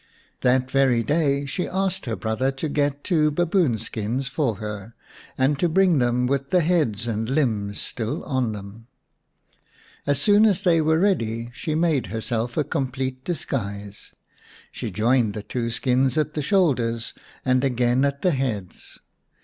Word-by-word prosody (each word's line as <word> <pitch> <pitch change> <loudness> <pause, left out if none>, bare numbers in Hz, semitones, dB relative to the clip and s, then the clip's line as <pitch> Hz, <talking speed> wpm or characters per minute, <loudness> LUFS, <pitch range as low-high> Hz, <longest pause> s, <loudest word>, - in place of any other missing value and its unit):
That 130 +1 +2
very 130 -4 +3
day 140 +1 +1
she 180 +6 -3
asked 190 -4 -2
her 115 - -1
brother 110 +5 -1
to 135 +4 -3
get 145 -1 -1
two 155 -5 +2
baboon 165 - +1
skins 115 +4 -3
for 135 -6 0
her, 105 +1 -7 0.4
and 135 +2 +2
to 175 - +2
bring 180 -2 +4
them 120 0 +1
with 135 +1 -1
the 180 - +3
heads 150 - +1
and 110 0 -2
limbs 110 -8 0
still 115 -2 -3
on 130 -5 -1
them. 105 +2 -9 1.2
As 140 -1 +2
soon 205 +6 +5
as 195 -5 +1
they 165 -3 +4
were 160 +1 +3
ready 120 - 0
she 155 +4 -3
made 160 -5 +1
herself 115 +2 -3
a 155 - +3
complete 130 -1 -3
disguise. 105 - -4 0.6
She - - -5
joined 115 -1 +1
the 105 - -5
two 115 +1 -3
skins 130 +2 +1
at 150 -1 0
the 150 - -2
shoulders 135 - +1 0.3
and 130 0 +2
again 125 0 +2
at 140 0 -1
the 180 - +4
heads. 115 - -4
130 Hz, 155 wpm, -23 LUFS, 115-155 Hz, 1.2 s, soon